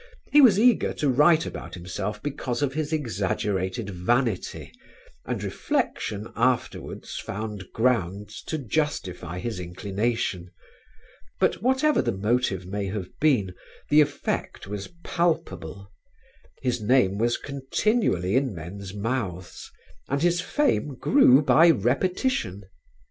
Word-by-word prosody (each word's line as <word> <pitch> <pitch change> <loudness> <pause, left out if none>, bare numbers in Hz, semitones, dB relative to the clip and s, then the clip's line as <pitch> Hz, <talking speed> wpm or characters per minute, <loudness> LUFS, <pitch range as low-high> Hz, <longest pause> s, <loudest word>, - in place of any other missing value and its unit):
He 295 - +7
was 225 -8 +7
eager 240 -1 +3
to 145 - 0
write 155 +5 +4
about - - -7
himself 95 +4 -5
because 135 -3 -2
of 135 -2 0
his 155 +1 -2
exaggerated 100 - -2
vanity 110 +3 -1 0.6
and - - -3
reflection 105 0 -2
afterwards 125 +1 -1
found 105 -2 -6
grounds 105 -4 -1
to 160 - -2
justify 105 - -2
his 110 +1 -4
inclination. 95 +1 -2 0.9
But 180 - +1
whatever 265 +5 +3
the 120 - 0
motive 105 -3 0
may 100 +2 -3
have 95 -2 -4
been 120 -12 +2 0.4
the 150 +1 +7
effect 145 -1 -2
was 100 0 -5 0.2
palpable: 100 - -2 0.7
his 125 -3 0
name 105 -4 +3
was 120 +1 +2
continually 135 - 0
in 130 -6 +1
men's 95 +4 -8
mouths, 100 -5 -4 0.4
and 140 +3 0
his 175 0 +3
fame 180 - 0
grew 145 - +5
by 165 +3 +6
repetition. 125 - 0
115 Hz, 115 wpm, -25 LUFS, 95-150 Hz, 0.9 s, He